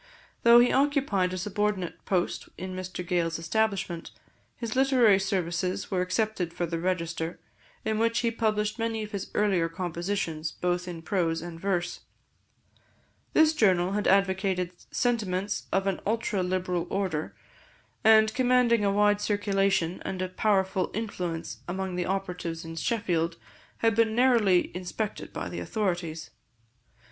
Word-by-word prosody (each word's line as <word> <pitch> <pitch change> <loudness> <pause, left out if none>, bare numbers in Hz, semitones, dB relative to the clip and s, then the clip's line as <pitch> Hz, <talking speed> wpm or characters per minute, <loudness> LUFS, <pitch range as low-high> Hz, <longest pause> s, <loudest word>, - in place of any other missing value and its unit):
Though 235 0 +8
he 240 +1 +6
occupied 270 -10 +2
a 185 - -3
subordinate 205 -1 -2
post 180 -2 -1
in 185 0 -5
Mr 185 -1 -5
Gales' 170 -2 0
establishment, 190 -1 -1 0.5
his 230 -1 -4
literary 255 -7 +5
services 185 -2 -1
were 185 -2 +1
accepted 185 -2 -1
for 175 - -1
the 165 0 -3
Register, 170 -1 -2 0.5
in 220 0 0
which 230 +1 +2
he 235 -1 +1
published 215 -1 0
many 225 -1 -1
of 210 - -8
his 200 -2 -4
earlier 190 -5 +2
compositions, 170 -2 -3
both 180 0 -1
in 170 -2 -6
prose 165 -4 0
and 170 -1 -7
verse. 175 -2 -1 1.3
This 315 0 +5
journal 185 - +3
had 205 +1 0
advocated 190 -2 +2 0.2
sentiments 205 -5 -1
of 195 0 +1
an 195 -2 0
ultra 215 -2 0
liberal 180 -1 -1
order, 185 -6 -2 0.7
and 220 0 +6
commanding 250 -3 +3
a 200 - +3
wide 205 0 +3
circulation 195 -4 +1
and 190 - -4
a 185 0 -2
powerful 190 -1 +1
influence 180 -7 -4
among 190 +1 -3
the 180 0 -2
operatives 180 -4 -3
in 165 0 -7
Sheffield, 170 -3 0 0.4
had 225 0 +2
been 225 -1 +2
narrowly 230 -8 +4
inspected 185 +4 -4
by - - -4
the - - -5
authorities. 175 -7 -2
190 Hz, 140 wpm, -28 LUFS, 175-215 Hz, 1.3 s, Though